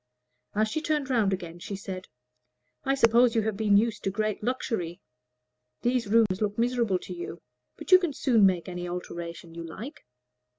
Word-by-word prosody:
As 215 Hz, +1 st, +3 dB
she 310 Hz, +9 st, -2 dB
turned 300 Hz, -3 st, -1 dB
round 220 Hz, -6 st, +3 dB
again 175 Hz, -2 st, -4 dB
she 200 Hz, -, -5 dB
said, 190 Hz, -1 st, -7 dB, 0.8 s
"I 270 Hz, -, +2 dB
suppose 235 Hz, -1 st, +5 dB
you 225 Hz, -, +3 dB
have 220 Hz, -1 st, -1 dB
been 205 Hz, -1 st, +4 dB
used 225 Hz, +1 st, 0 dB
to -, -, +1 dB
great 215 Hz, +1 st, -1 dB
luxury; 215 Hz, -8 st, -2 dB, 0.8 s
these 245 Hz, -2 st, +1 dB
rooms 210 Hz, -3 st, +3 dB
look 205 Hz, -1 st, -1 dB
miserable 235 Hz, -4 st, +1 dB
to 180 Hz, -, -8 dB
you, 175 Hz, -1 st, -6 dB, 0.4 s
but 315 Hz, -, -8 dB
you 370 Hz, -, +10 dB
can 350 Hz, -4 st, -1 dB
soon 240 Hz, -6 st, +3 dB
make 185 Hz, -3 st, +3 dB
any 175 Hz, -1 st, -5 dB
alterations 170 Hz, -1 st, -6 dB
you 170 Hz, -, -6 dB
like." 215 Hz, -, -8 dB
210 Hz, 175 wpm, -27 LUFS, 185-240 Hz, 0.8 s, you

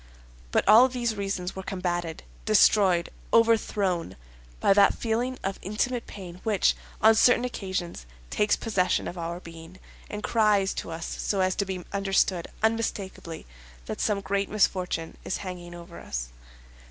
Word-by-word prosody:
But -, -, +1 dB
all 230 Hz, +4 st, +8 dB
these 245 Hz, -3 st, -2 dB
reasons 195 Hz, -2 st, -3 dB
were 190 Hz, -, -5 dB
combated, 175 Hz, -3 st, -3 dB, 0.2 s
destroyed, 180 Hz, -, +4 dB, 0.2 s
overthrown, 210 Hz, -6 st, +2 dB, 0.4 s
by -, -, +4 dB
that 200 Hz, 0 st, +5 dB
feeling 240 Hz, +3 st, -1 dB
of 195 Hz, 0 st, -3 dB
intimate 230 Hz, +5 st, -2 dB
pain 180 Hz, -2 st, -9 dB
which, 210 Hz, -4 st, +2 dB, 0.3 s
on 220 Hz, +1 st, +8 dB
certain 245 Hz, +2 st, +4 dB
occasions, 185 Hz, -, -4 dB, 0.2 s
takes 210 Hz, 0 st, +2 dB
possession 195 Hz, -5 st, 0 dB
of -, -, -6 dB
our 170 Hz, +1 st, -4 dB
being, 165 Hz, +1 st, -12 dB, 0.3 s
and 210 Hz, 0 st, -6 dB
cries 210 Hz, -4 st, +2 dB
to -, -, -5 dB
us 165 Hz, 0 st, -5 dB, 0.2 s
so 195 Hz, -2 st, 0 dB
as 185 Hz, 0 st, +2 dB
to 200 Hz, -, +1 dB
be 185 Hz, -2 st, -5 dB
understood 195 Hz, -3 st, +1 dB, 0.2 s
unmistakably 210 Hz, -7 st, -2 dB, 0.4 s
that -, -, -5 dB
some 205 Hz, -2 st, +1 dB
great 200 Hz, 0 st, -1 dB
misfortune 185 Hz, -5 st, 0 dB
is -, -, -2 dB
hanging 175 Hz, -1 st, -7 dB
over 170 Hz, 0 st, -11 dB
us. -, -, -5 dB
195 Hz, 145 wpm, -27 LUFS, 175-215 Hz, 0.4 s, all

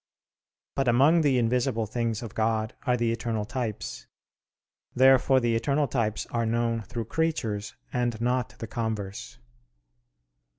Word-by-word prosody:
But 135 Hz, -1 st, 0 dB
among 140 Hz, +8 st, +5 dB
the 140 Hz, -4 st, +3 dB
invisible 120 Hz, -1 st, +1 dB
things 115 Hz, +1 st, -2 dB
of 115 Hz, -, -7 dB
God 110 Hz, 0 st, 0 dB
are 125 Hz, 0 st, +3 dB
the 120 Hz, -1 st, +1 dB
eternal 115 Hz, -2 st, -2 dB
types. 110 Hz, -, -4 dB, 0.9 s
Therefore 130 Hz, +1 st, +5 dB
the 120 Hz, -2 st, +1 dB
eternal 140 Hz, +5 st, +1 dB
types 110 Hz, -5 st, -1 dB
are 115 Hz, -1 st, 0 dB
known 115 Hz, 0 st, 0 dB
through 115 Hz, +2 st, -5 dB
creatures 115 Hz, -9 st, -2 dB, 0.2 s
and 120 Hz, -2 st, 0 dB
not 125 Hz, +1 st, 0 dB
the -, -, -5 dB
converse. 110 Hz, -1 st, -4 dB
120 Hz, 130 wpm, -27 LUFS, 110-125 Hz, 0.9 s, among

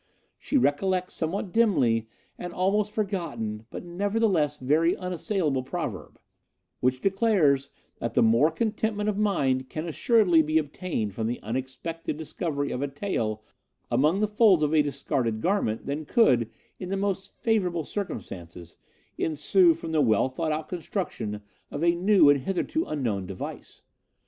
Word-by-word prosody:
She 285 Hz, -, 0 dB
recollects, 185 Hz, -, +1 dB
somewhat 180 Hz, +3 st, -3 dB
dimly, 125 Hz, -, +3 dB, 0.3 s
an 180 Hz, -1 st, -6 dB
almost 200 Hz, +3 st, +1 dB
forgotten, 155 Hz, -, -3 dB
but -, -, -7 dB
nevertheless, 185 Hz, -4 st, 0 dB
very 155 Hz, +6 st, +2 dB
unassailable 180 Hz, -, -1 dB
proverb, 130 Hz, -, -5 dB, 0.6 s
which 130 Hz, +1 st, +1 dB
declares 190 Hz, -, +2 dB, 0.3 s
that 115 Hz, -1 st, -4 dB
more 115 Hz, +7 st, +5 dB
contentment 215 Hz, 0 st, -1 dB
of 205 Hz, -, -2 dB
mind 135 Hz, -11 st, +1 dB
can 155 Hz, +4 st, -4 dB
assuredly 180 Hz, -1 st, +4 dB
be 155 Hz, +1 st, +1 dB
obtained 150 Hz, -, -2 dB
from 110 Hz, +2 st, -2 dB
the 120 Hz, -, -3 dB
unexpected 130 Hz, +7 st, -4 dB
discovery 150 Hz, -2 st, -3 dB
of 125 Hz, -, -3 dB
a 145 Hz, -, 0 dB
tael 120 Hz, -, -3 dB, 0.5 s
among 155 Hz, +8 st, +2 dB
the 215 Hz, -, +3 dB
folds 210 Hz, -6 st, +4 dB
of 150 Hz, +1 st, +1 dB
a 155 Hz, -, +5 dB
discarded 125 Hz, -5 st, -1 dB
garment 170 Hz, -, 0 dB
than 145 Hz, +3 st, -3 dB
could, 125 Hz, -, +3 dB, 0.3 s
in 180 Hz, -, -6 dB
the 195 Hz, -, -1 dB
most 195 Hz, -1 st, -3 dB
favourable 180 Hz, -7 st, +1 dB
circumstances, 85 Hz, -, -7 dB, 0.4 s
ensue 165 Hz, +3 st, +3 dB
from 165 Hz, 0 st, -7 dB
the 155 Hz, -2 st, +2 dB
well 110 Hz, -3 st, +3 dB
thought 155 Hz, +4 st, -2 dB
out 155 Hz, 0 st, -2 dB
construction 125 Hz, -, -4 dB, 0.3 s
of 145 Hz, -, -4 dB
a 170 Hz, 0 st, +4 dB
new 185 Hz, 0 st, +4 dB
and 145 Hz, -1 st, +5 dB
hitherto 195 Hz, -, -1 dB
unknown 110 Hz, -11 st, -2 dB
device. 95 Hz, -1 st, -8 dB
160 Hz, 145 wpm, -26 LUFS, 130-195 Hz, 0.6 s, more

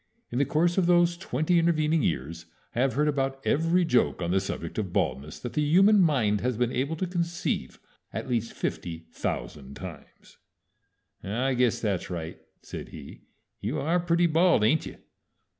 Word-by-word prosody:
In 120 Hz, -, -1 dB
the 140 Hz, -, +3 dB
course 170 Hz, +6 st, +2 dB
of 175 Hz, -, +2 dB
those 175 Hz, -1 st, +4 dB
twenty 170 Hz, 0 st, +1 dB
intervening 160 Hz, -1 st, +2 dB
years 80 Hz, -, -2 dB, 0.3 s
I 120 Hz, -, -3 dB
have 130 Hz, -1 st, +2 dB
heard 150 Hz, +2 st, +2 dB
about 135 Hz, -2 st, 0 dB
every 165 Hz, +4 st, +2 dB
joke 125 Hz, -7 st, +2 dB
on 85 Hz, -1 st, -2 dB
the 95 Hz, -, +3 dB
subject 95 Hz, -1 st, -4 dB
of 95 Hz, -4 st, -3 dB
baldness 75 Hz, -1 st, -1 dB
that 120 Hz, -, -5 dB
the 150 Hz, -, +1 dB
human 195 Hz, +8 st, +5 dB
mind 120 Hz, -, +2 dB
has 125 Hz, -2 st, -1 dB
been 120 Hz, 0 st, +1 dB
able 140 Hz, +6 st, -1 dB
to 185 Hz, -, -2 dB
conceive 175 Hz, -1 st, -2 dB, 0.3 s
at -, -, -5 dB
least 115 Hz, -2 st, -1 dB
fifty 80 Hz, -1 st, -4 dB
thousand 70 Hz, -4 st, -5 dB
times." -, -, -11 dB, 0.9 s
"I 125 Hz, +7 st, 0 dB
guess 125 Hz, -2 st, +2 dB
that's 100 Hz, -6 st, -2 dB
right," 80 Hz, -2 st, -5 dB, 0.2 s
said -, -, -8 dB
he. -, -, -11 dB, 0.3 s
"You -, -, -2 dB
are 170 Hz, +4 st, +1 dB
pretty 170 Hz, 0 st, +2 dB
bald, 170 Hz, -5 st, +4 dB
ain't 145 Hz, +9 st, +2 dB
you?" -, -, -9 dB
135 Hz, 175 wpm, -27 LUFS, 105-170 Hz, 0.9 s, human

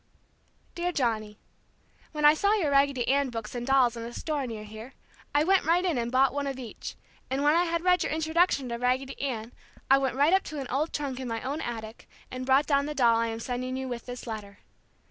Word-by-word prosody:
Dear 350 Hz, +1 st, -1 dB
Johnny: 220 Hz, -8 st, -1 dB, 0.7 s
When 300 Hz, -1 st, -1 dB
I 295 Hz, -, +9 dB
saw 400 Hz, +6 st, +2 dB
your 350 Hz, -9 st, +1 dB
Raggedy 275 Hz, -3 st, +2 dB
Ann 280 Hz, 0 st, +2 dB
books 225 Hz, -3 st, -6 dB
and 240 Hz, 0 st, -4 dB
dolls 260 Hz, -3 st, +4 dB
in 230 Hz, -, -6 dB
a 230 Hz, +1 st, -6 dB
store 290 Hz, +1 st, -3 dB
near 220 Hz, -2 st, -6 dB
here, 220 Hz, +4 st, -10 dB, 0.4 s
I 290 Hz, -, +5 dB
went 380 Hz, +3 st, +3 dB
right 345 Hz, +4 st, +2 dB
in 330 Hz, -9 st, +1 dB
and 235 Hz, 0 st, -2 dB
bought 260 Hz, 0 st, +3 dB
one 285 Hz, 0 st, -2 dB
of 270 Hz, -1 st, -3 dB
each, 245 Hz, -4 st, -7 dB, 0.3 s
and 270 Hz, +2 st, -1 dB
when 295 Hz, +1 st, +5 dB
I 345 Hz, +2 st, +3 dB
had 335 Hz, 0 st, -1 dB
read 360 Hz, 0 st, +4 dB
your -, -, -1 dB
introduction 320 Hz, -2 st, +1 dB
to 235 Hz, -, -3 dB
"Raggedy 260 Hz, +2 st, -1 dB
Ann" 240 Hz, -4 st, -3 dB, 0.4 s
I 270 Hz, -, +7 dB
went 265 Hz, -2 st, -1 dB
right 290 Hz, +6 st, +4 dB
up 385 Hz, -, +5 dB
to 305 Hz, -, -5 dB
an 270 Hz, -, -4 dB
old 295 Hz, +5 st, 0 dB
trunk 275 Hz, -3 st, -3 dB
in 260 Hz, -, -5 dB
my 230 Hz, -1 st, -3 dB
own 285 Hz, +5 st, -3 dB
attic 225 Hz, -3 st, -7 dB, 0.2 s
and 255 Hz, 0 st, -5 dB
brought 270 Hz, +2 st, +4 dB
down 280 Hz, -1 st, +2 dB
the 300 Hz, -, -4 dB
doll 240 Hz, -4 st, +4 dB
I 230 Hz, 0 st, +1 dB
am 225 Hz, 0 st, -4 dB
sending 255 Hz, +2 st, -3 dB
you 265 Hz, 0 st, -4 dB
with 240 Hz, -1 st, -6 dB
this 245 Hz, 0 st, -7 dB
letter. 210 Hz, -3 st, -7 dB
265 Hz, 235 wpm, -28 LUFS, 240-295 Hz, 0.7 s, I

